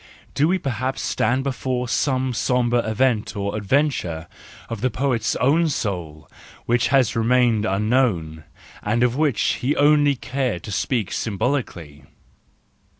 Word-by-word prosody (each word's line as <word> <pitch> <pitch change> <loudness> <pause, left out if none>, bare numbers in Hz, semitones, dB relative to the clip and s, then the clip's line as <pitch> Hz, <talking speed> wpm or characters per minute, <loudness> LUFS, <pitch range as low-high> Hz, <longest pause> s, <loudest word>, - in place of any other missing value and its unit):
Do 145 +4 +2
we 185 +3 +2
perhaps 130 -4 -3
stand 125 +5 0
before 130 -2 -2
some 130 0 0
sombre 120 0 +1
event 110 -1 0
or 100 0 -3
adventure 105 - 0 0.4
of 115 -3 -6
the 130 - +1
poet's 125 -2 -1
own 155 +6 +2
soul, 85 - -4 0.4
which 120 +1 +2
has 130 -3 +2
remained 115 -1 +2
unknown, 95 - 0 0.4
and 115 +4 0
of 125 0 +2
which 145 -5 +1 0.2
he 135 +4 +1
only 145 -1 +4
cared 125 -7 -3
to 105 - -7
speak 110 +1 -1
symbolically? 95 - -3
125 Hz, 130 wpm, -22 LUFS, 105-135 Hz, 0.4 s, only